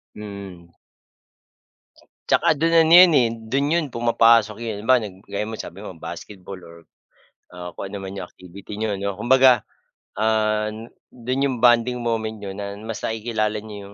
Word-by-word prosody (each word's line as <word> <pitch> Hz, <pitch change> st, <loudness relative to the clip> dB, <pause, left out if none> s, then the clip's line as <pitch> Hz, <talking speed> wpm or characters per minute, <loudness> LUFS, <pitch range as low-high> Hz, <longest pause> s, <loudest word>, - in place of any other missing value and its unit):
Mm. 100 Hz, -5 st, -10 dB, 1.6 s
Tsaka -, -, +3 dB
dun 165 Hz, +3 st, 0 dB
ano 165 Hz, -1 st, +4 dB
'yan 180 Hz, -1 st, +9 dB
eh, 120 Hz, -2 st, +3 dB, 0.2 s
do'n 140 Hz, +3 st, +1 dB
'yon 170 Hz, -3 st, +1 dB
pumapasok 115 Hz, -2 st, +3 dB
'yong 110 Hz, -1 st, -5 dB
iba 130 Hz, -, +6 dB, 0.3 s
gaya 100 Hz, +1 st, -3 dB
mo, 110 Hz, -1 st, -7 dB
sabi 95 Hz, +5 st, -8 dB
mo, -, -, -7 dB
basketball 95 Hz, +1 st, -9 dB
or 85 Hz, 0 st, -13 dB, 0.8 s
ah, 90 Hz, 0 st, -7 dB
kung -, -, -4 dB
ano -, -, -9 dB
naman 95 Hz, +1 st, -7 dB
'yong 90 Hz, -, -5 dB
activity 95 Hz, +3 st, -12 dB
niyo, 105 Hz, -2 st, -2 dB
'no. 100 Hz, 0 st, -3 dB
Kumbaga, 125 Hz, +1 st, +4 dB, 0.6 s
ah, 110 Hz, -1 st, +1 dB, 0.4 s
do'n 130 Hz, +3 st, -3 dB
'yong 130 Hz, -2 st, -3 dB
bonding 120 Hz, 0 st, +3 dB
moment 110 Hz, -2 st, -2 dB
niyo 100 Hz, -2 st, -7 dB
na 100 Hz, 0 st, -6 dB
mas 110 Hz, +2 st, -7 dB
nakikilala 110 Hz, -1 st, -2 dB
niyo 105 Hz, -2 st, -9 dB
110 Hz, 155 wpm, -22 LUFS, 100-120 Hz, 1.6 s, yan